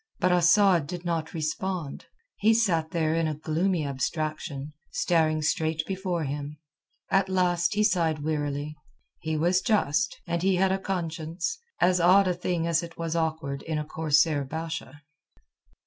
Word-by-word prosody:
But 180 - +2
Asad 175 -2 +4
did 175 +1 -6
not 165 -1 -2
respond. 160 0 -3 0.3
He 220 +2 +4
sat 170 -8 +1
there 160 -2 0
in 165 -1 +1
a 155 - -2
gloomy 160 +2 0
abstraction, 150 +1 -3 0.2
staring 155 -2 +1
straight 160 0 0
before 185 -3 -2
him. 145 +1 -5 0.5
At 195 -1 +3
last 180 +1 +1
he 210 - +3
sighed 165 -7 +1
wearily. 150 -1 -2 0.4
He 160 -1 -2
was 175 +4 +2
just, 210 - +1
and 170 -1 -2
he 190 +1 +2
had 190 +1 +2
a 190 - 0
conscience, 170 - -3 0.2
as 180 0 +3
odd 185 +3 +5
a 180 - +2
thing 175 -1 -2
as 165 0 +2
it 170 -1 -9
was 165 -1 -3
awkward 160 -4 -2
in 160 -1 -3
a 150 - -2
corsair 155 -1 +2
Basha. 160 +1 -6
165 Hz, 155 wpm, -27 LUFS, 155-180 Hz, 0.5 s, odd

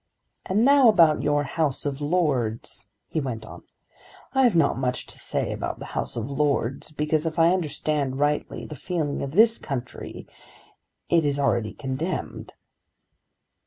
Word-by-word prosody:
"And 210 +5 +2
now 280 -2 +6
about 165 -7 +5
your 145 0 +1
House 145 0 -1
of 140 0 -3
Lords," 135 - -1 0.2
he 160 - -2
went 115 -5 -4
on. - - -11 0.7
"I 265 - +3
have 240 -8 +4
not 160 -4 +3
much 125 -1 -1
to - - -9
say - - -2
about - - -4
the - - -8
House - - -2
of 115 -1 -3
Lords, 140 -1 -1
because 150 +1 0
if 160 +1 -4
I 165 +2 +5
understand 150 -5 -1
rightly 145 +1 -1
the - - -8
feeling 155 -1 -2
of 140 0 -4
this 225 +4 +5
country 130 -4 -6 0.8
it 170 -1 +3
is 145 -1 +1
already 120 -6 +1
condemned." 150 +6 -4
150 Hz, 155 wpm, -25 LUFS, 135-165 Hz, 0.8 s, now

